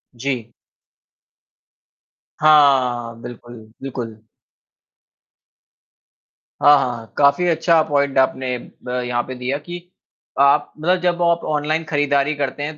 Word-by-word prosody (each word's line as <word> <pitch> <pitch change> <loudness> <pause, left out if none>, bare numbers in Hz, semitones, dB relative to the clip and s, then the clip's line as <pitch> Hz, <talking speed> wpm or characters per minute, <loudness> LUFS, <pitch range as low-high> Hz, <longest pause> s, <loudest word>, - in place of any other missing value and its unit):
जी। 120 -2 -4 1.9
हाँ, 135 -6 +4
बिल्कुल, 120 0 -10 0.3
बिल्कुल। 125 -4 -6 2.5
हाँ, 145 0 +7
हाँ, 120 -4 -4
काफ़ी 140 +5 +3
अच्छा 165 -1 +3
पॉइंट 140 -2 0
आपने 130 -1 +1 0.3
ब - - -8 0.2
यहाँ 120 0 -1
पे 130 +1 -8
दिया 125 +3 -3
कि 175 +4 -8 0.6
आप 140 +1 +3
मतलब 180 +3 +1
जब 175 -1 0
आप 170 -1 +2
ऑनलाइन 155 +2 -1
खरीदारी 145 -1 +1
करते 145 0 -3
हैं 150 +1 -5
140 Hz, 110 wpm, -20 LUFS, 125-155 Hz, 2.5 s, हाँ